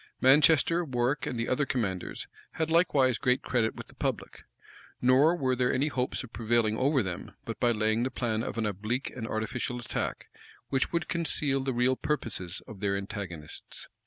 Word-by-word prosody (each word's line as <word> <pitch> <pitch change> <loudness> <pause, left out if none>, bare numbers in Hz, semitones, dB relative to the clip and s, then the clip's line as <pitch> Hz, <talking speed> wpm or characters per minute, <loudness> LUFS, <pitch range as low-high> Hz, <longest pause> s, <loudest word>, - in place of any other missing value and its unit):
Manchester, 155 +5 +5
Warwick, 130 -1 0
and 125 - -3
the 115 - -1
other 130 +3 +1
commanders, 100 -8 -2 0.3
had 160 0 -1
likewise 140 -8 +3
great 125 -1 +2
credit 115 -3 0
with - - -8
the - - -18
public; - - -4 0.5
nor 135 +7 +5
were 130 -6 +1
there 125 0 +2
any 140 +4 +1
hopes 130 -2 -2
of 125 - -12
prevailing 115 -1 +1
over 135 +2 +2
them, 90 -3 -6
but - - -5
by 120 - +3
laying 110 0 +1
the 130 - 0
plan 115 -4 -1
of 115 - -4
an 115 - 0
oblique 105 +6 -2
and 115 -3 -4
artificial 115 +3 -2
attack, 120 - -4 0.4
which 135 -1 +1
would 170 - -1
conceal 150 -5 0
the 135 0 -1
real 125 +1 +2
purposes 105 - -2
of 105 - -10
their 100 -1 0
antagonists. 100 -6 -7
125 Hz, 180 wpm, -29 LUFS, 110-135 Hz, 0.5 s, Manchester